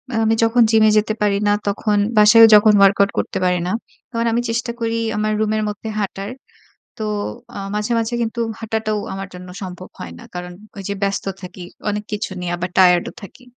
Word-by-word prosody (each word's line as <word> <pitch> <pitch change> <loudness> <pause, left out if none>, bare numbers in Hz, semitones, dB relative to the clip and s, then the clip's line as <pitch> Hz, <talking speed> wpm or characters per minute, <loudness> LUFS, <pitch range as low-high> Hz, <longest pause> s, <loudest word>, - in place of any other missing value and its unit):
আম - - 0
আমি 220 0 +3
যখন 230 +2 +3
Gym 220 -1 +5
এ - - +6
যেতে 215 +1 +1
পারি 205 -1 +2
না 205 - +4
তখন 205 +1 0 0.2
বাসায়ও 215 +2 +8
যখন 210 +1 +6
WorkOut 200 0 +5
করতে - - -2
পারি 180 0 +2
না। - - -1 0.4
কারণ 230 -1 -1
আমি 235 - +1
চেষ্টা 235 +1 -1
করি 230 0 -1 0.2
আমার 215 0 0
Room 215 -1 +1
এর 215 - -1
মধ্যে 210 +2 -6
হাঁটার। 200 0 -4 0.7
তো 220 - -3 0.5
আ - - -4 0.2
মাঝে 210 +3 -1
মাঝে 230 +1 -2
কিন্তু 230 +1 -3 0.2
হাঁটাটাও 220 -1 -2 0.2
আমার 195 0 -6
জন্য 180 0 -10
সম্ভব 185 0 -8
হয় 85 -2 -7
না। - - -12
কারণ 180 0 -6 0.2
ওই 200 - -6
যে 200 - -2
ব্যস্ত 200 0 -1 0.2
থাকি, 180 0 -9 0.3
অনেক 210 0 -3
কিছু 210 0 -3
নিয়ে 175 -1 -3
আবার 180 +1 -4
Tired 180 -2 +5
ও - - -17
থাকি। 250 +6 -13
210 Hz, 210 wpm, -19 LUFS, 190-225 Hz, 0.7 s, বাসায়ও